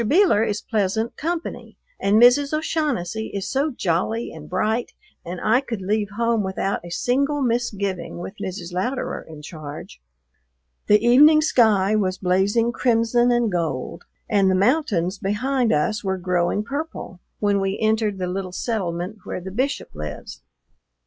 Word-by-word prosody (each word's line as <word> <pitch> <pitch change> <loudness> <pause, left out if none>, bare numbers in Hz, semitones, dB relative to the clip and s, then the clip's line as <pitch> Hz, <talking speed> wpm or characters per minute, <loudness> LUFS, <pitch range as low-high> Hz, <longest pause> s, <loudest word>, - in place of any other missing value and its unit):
Beeler 305 - +4
is 210 -2 -2
pleasant 220 +1 -1
company, 335 +2 -4 0.2
and 205 +2 +3
Mrs. 280 +5 +5
O'Shaughnessy 260 - -2
is 200 0 -3
so 275 +6 0
jolly 220 - -1
and 150 -1 -11
bright, 215 +6 -1 0.3
and 175 +1 -6
I 225 +4 +3
could 235 -6 -5
leave 210 +1 0
home 230 -1 +2
without 190 0 -2
a 175 - -9
single 275 +9 0
misgiving 205 -7 -2
with 175 +2 -6
Mrs. 180 -2 -6
Louderer 245 +9 -2
in 155 -2 -12
charge. 150 - -9 0.9
The 210 +2 +4
evening 300 +6 +7
sky 215 -8 +3
was 190 -3 0
blazing 200 +6 +2
crimson 240 0 +2
and 240 -3 +2
gold, 160 -8 -3 0.2
and 200 -3 +3
the 185 - +3
mountains 200 - +1
behind 240 +5 0
us 205 +8 0
were 190 -1 -1
growing 180 +2 0
purple 280 - -6 0.2
when 200 -1 +1
we 195 +1 -1
entered 220 -2 +1
the 185 - -2
little 185 +1 -4
settlement 185 -2 -3
where - - -5
the 190 +1 -8
Bishop 260 +8 -2
lives. 75 -1 -7
210 Hz, 150 wpm, -22 LUFS, 185-240 Hz, 0.9 s, evening